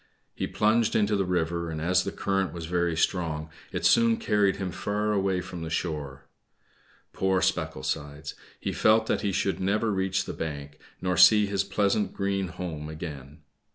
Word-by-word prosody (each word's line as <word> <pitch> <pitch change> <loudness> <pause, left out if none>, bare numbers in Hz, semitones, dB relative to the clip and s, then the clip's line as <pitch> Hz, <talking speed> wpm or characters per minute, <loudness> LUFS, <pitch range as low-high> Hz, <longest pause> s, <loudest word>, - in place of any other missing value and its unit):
He - - -3
plunged 110 +1 +2
into 105 -1 +2
the 100 -1 +1
river, 85 -1 -1
and 80 -1 -4
as 90 +4 +2
the - - -2
current 95 -1 -1
was 85 -2 -6
very 85 -1 0
strong 80 -3 -1 0.2
it - - -3
soon 115 -1 +5
carried 105 -4 +2
him 95 -2 -4
far 105 +3 -1
away 95 -3 +1
from 90 -1 -8
the 80 - -4
shore. 75 -5 -4 0.9
Poor 95 0 +1
Specklesides! 75 -1 -2 0.3
he - - -3
felt 110 +1 +4
that - - 0
he 100 - 0
should 95 +1 0
never 105 +4 +1
reach 95 -1 0
the - - -5
bank, 75 -2 -6 0.2
nor 90 -1 0
see 105 +4 +7
his 100 -1 0
pleasant 100 +1 0
green 100 -1 -1
home 85 -4 -6
again. 75 -2 -8
90 Hz, 170 wpm, -27 LUFS, 80-100 Hz, 0.9 s, see